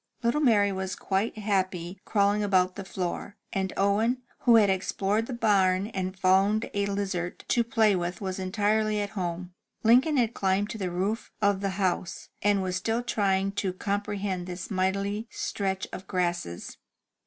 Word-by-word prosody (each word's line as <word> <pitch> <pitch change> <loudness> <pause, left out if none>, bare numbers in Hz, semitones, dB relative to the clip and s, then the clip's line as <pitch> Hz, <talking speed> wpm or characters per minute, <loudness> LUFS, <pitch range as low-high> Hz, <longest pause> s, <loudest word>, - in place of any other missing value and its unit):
Little 235 +6 +2
Mary 210 -7 +4
was 190 0 -3
quite 200 +4 -1
happy 190 -3 -1
crawling 205 0 +2
about 185 -3 +2
the 195 - -6
floor, 185 +3 -4 0.2
and 190 -1 -1
Owen, 220 +6 +2 0.2
who 240 -2 +5
had 215 -2 +6
explored 195 +3 0
the 260 - -4
barn 195 -5 +3
and 185 0 -3
found 195 +4 +3
a 200 0 0
lizard 195 -3 -3
to 240 - +3
play 220 -3 +3
with, 175 0 -3
was 190 -1 -4
entirely 210 +2 +1
at 205 -1 -2
home. 180 -2 -4 0.3
Lincoln 255 +7 +5
had 235 -2 +2
climbed 195 +2 0
to 220 - -6
the 185 -2 -1
roof 195 +6 -2
of 205 -2 +2
the 195 -1 -2
house, 185 -2 -2
and 205 -1 +2
was 185 0 -1
still 225 +5 -1
trying 195 -4 +1
to 195 -2 -2
com 200 +2 -1
prehend 195 -3 -3
this 180 +3 -6
mighty 200 +3 -1
stretch 190 -2 -2
of 190 - -7
grasses. 175 - -2
195 Hz, 165 wpm, -27 LUFS, 185-210 Hz, 0.3 s, had